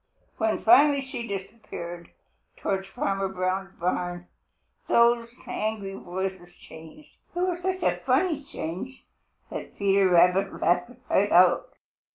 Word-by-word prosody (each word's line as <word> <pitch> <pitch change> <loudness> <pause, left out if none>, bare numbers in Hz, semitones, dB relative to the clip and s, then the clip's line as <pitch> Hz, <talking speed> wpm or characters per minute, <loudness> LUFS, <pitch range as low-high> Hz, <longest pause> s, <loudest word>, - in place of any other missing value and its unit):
When 220 -1 0
finally 280 +5 +6
she 260 -3 -6
disappeared 190 -4 -7 0.5
towards 195 -1 -2
Farmer 195 0 -1
Brown's 190 +1 -2
barn, 175 0 -2 0.6
those 235 0 +4 0.2
angry 210 -2 -3
voices 185 -1 -5
changed. 160 - -14 0.2
It 350 - -1
was 360 -1 -1
such 375 +1 -2
a - - +2
funny 335 -6 +1
change 220 - -7 0.5
that - - -7
Peter 195 -1 +3
Rabbit 180 +2 +3
laughed 175 +7 +2 0.2
right 205 +2 +2
out. 175 0 +4
195 Hz, 120 wpm, -26 LUFS, 180-235 Hz, 0.6 s, finally